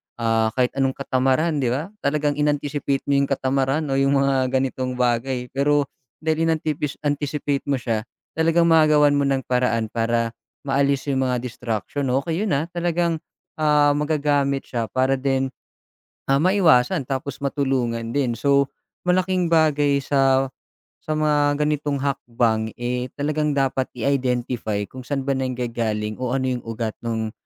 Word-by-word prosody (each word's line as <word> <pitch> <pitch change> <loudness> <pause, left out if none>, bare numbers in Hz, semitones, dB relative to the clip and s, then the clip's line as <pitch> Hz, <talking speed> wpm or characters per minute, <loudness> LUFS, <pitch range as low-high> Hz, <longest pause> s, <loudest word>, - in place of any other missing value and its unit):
ah, 115 -1 +1
kahit 125 -1 +2
anong 135 -1 +1
katamaran, 140 +4 +1
'di 130 - +1
ba? 160 +8 -4
Talagang 145 0 0
in-anticipate 145 -1 0
mo 140 -1 +2
yung 140 - +1
katamaran 135 +2 0
o 135 - +2
yung 135 +1 +3
mga 135 -1 +2
ganitong 130 -1 -1
bagay. 125 +1 -1
Pero, 145 0 +1 0.3
dahil 160 +1 +1
inantipis 155 -3 -1
anticipate 145 -1 -1
mo 140 - +2
siya, 115 -3 -2 0.3
talagang 165 +1 +3
magagawan 155 -3 +5
mo 140 - +2
ng 135 -1 0
paraan 120 -3 +1
para 115 0 0 0.3
maalis 140 0 +1
yung 130 0 +1
mga 125 -1 0
distraction. 120 +2 -4
Okey 160 +8 0
'yon, 215 - -1
ah, 150 +4 -1
talagang, 170 -1 0 0.4
ah, 150 -1 +4
magagamit 145 -2 0
siya 115 -2 -2
para 130 +1 +2
din, 135 0 0 0.8
ah, 135 - +4
maiwasan 170 -5 +3
tapos 135 +1 -4
matulungan 130 -5 -1
din. 130 -4 +1
So, 140 +3 +2 0.4
malaking 185 0 +2
bagay 150 -3 +3
sa, 135 -1 +2 0.5
sa 155 - -5
mga 145 -1 +2
ganitong 150 -1 0
hakbang, 115 -5 0
eh, 125 +1 -2
talagang 150 +1 0
dapat 135 -1 +1
i-identify 125 -5 -1
kung 130 - -9
sa'n 135 0 -2
ba 140 - 0
nanggagaling 115 -4 -2
o 125 -1 -1
ano 130 -1 0
yung - - -17
ugat 115 0 -3
no'ng, 110 -1 -2
135 Hz, 145 wpm, -22 LUFS, 125-150 Hz, 0.8 s, magagawan